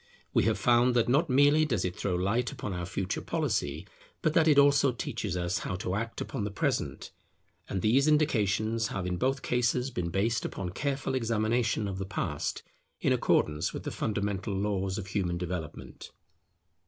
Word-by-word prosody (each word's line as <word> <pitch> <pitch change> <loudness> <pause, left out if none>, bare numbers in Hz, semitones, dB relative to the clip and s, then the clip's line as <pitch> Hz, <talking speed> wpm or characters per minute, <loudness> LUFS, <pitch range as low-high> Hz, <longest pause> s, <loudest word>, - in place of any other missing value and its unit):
We - - +3
have 110 -2 +2
found 120 +4 +3
that 120 - +3
not 140 +7 +2
merely 145 +4 +5
does 115 -12 0
it 90 0 -3
throw 95 -3 -1
light 100 +9 0
upon 115 -7 -5
our 90 -1 -4
Future 95 0 -3
policy, 105 - -1 0.4
but 155 - +2
that 160 0 +4
it 150 -2 +5
also 140 -1 +5
teaches 105 -5 -3
us 85 0 -1
how 90 - -3
to 90 0 -3
act 115 +3 -3
upon - - -3
the 105 - -2
Present; 100 - -2 0.6
and 95 - -2
these 130 +7 +4
indications 110 -7 +2
have 100 -3 -4
in 90 -1 -2
both 130 +5 0
cases 125 +1 +1
been 85 -6 -2
based 105 +5 0
upon 90 -2 -4
careful 140 +6 -2
examination 115 -2 0
of 95 -1 -4
the 95 - -3
Past, 100 - -3 0.4
in - - +2
accordance 75 +2 +1
with - - -5
the - - -4
fundamental 100 -2 -2
laws 95 -1 -1
of 105 - -4
human 95 -3 -1
development. 85 -3 -6
105 Hz, 180 wpm, -29 LUFS, 95-125 Hz, 0.6 s, merely